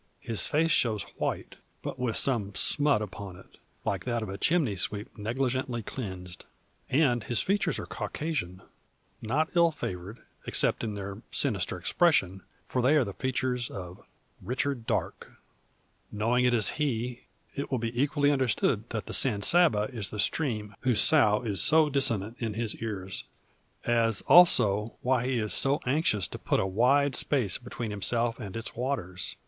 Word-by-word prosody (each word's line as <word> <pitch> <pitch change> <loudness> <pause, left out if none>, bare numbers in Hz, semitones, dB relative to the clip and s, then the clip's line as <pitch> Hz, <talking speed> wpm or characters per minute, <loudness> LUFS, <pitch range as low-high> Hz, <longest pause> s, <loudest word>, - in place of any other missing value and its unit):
His 115 -2 -1
face 165 +2 +1
shows 110 -7 +2
white, - - -3 0.3
but - - -5
with 125 -3 -1
some 105 -7 0
smut 145 -7 +2
upon 100 -2 -8
it, 95 - -18 0.3
like - - -1
that 120 -2 -1
of 110 - -6
a 95 - -5
chimney 155 - +1
sweep 105 +3 -3
negligently 120 +2 -2
cleansed. 95 -7 -7 0.4
And 125 -5 +2
his 120 - +1
features 195 -3 0
are - - -5
Caucasian, 115 - -4 0.6
not 140 +8 0
ill 170 -1 +5
favoured, 100 - -7 0.2
except - - +1
in 110 -2 -3
their 100 0 -6
sinister - - 0
expression; 95 - +1 0.2
for 125 - -1
they 130 +5 +4
are 150 - +4
the 100 -4 -6
features 125 -1 -2
of 90 -2 -8 0.4
Richard 125 +2 -3
Darke. - - -3 0.8
Knowing 115 +4 +1
it 125 - +3
is 110 -4 +3
he, 125 -3 -2 0.3
it 140 - -4
will 130 - 0
be 115 0 -3
equally 145 0 +2
understood 130 -8 0
that - - -4
the - - -7
San 100 -1 +3
Saba 165 -12 +4
is 110 -5 -2
the 105 - -7
stream 105 -3 -1
whose 125 -4 +1
sough 115 -7 +4
is 100 -6 +1
so 155 -1 +4
dissonant 115 -5 0
in 110 -3 -3
his 115 -1 -1
ears, 95 -4 -3 0.6
as 115 -3 +2
also, 110 - +5
why 125 -1 +1
he 130 -1 0
is 110 -2 0
so 140 +2 +3
anxious 125 - +1
to - - -8
put - - 0
a - - +1
wide 130 +8 +2
space 125 -8 +1
between 120 -2 -6
himself 115 +4 -1
and 105 -2 -6
its 115 - -7
waters. 120 -8 -3
120 Hz, 165 wpm, -28 LUFS, 105-135 Hz, 0.8 s, ill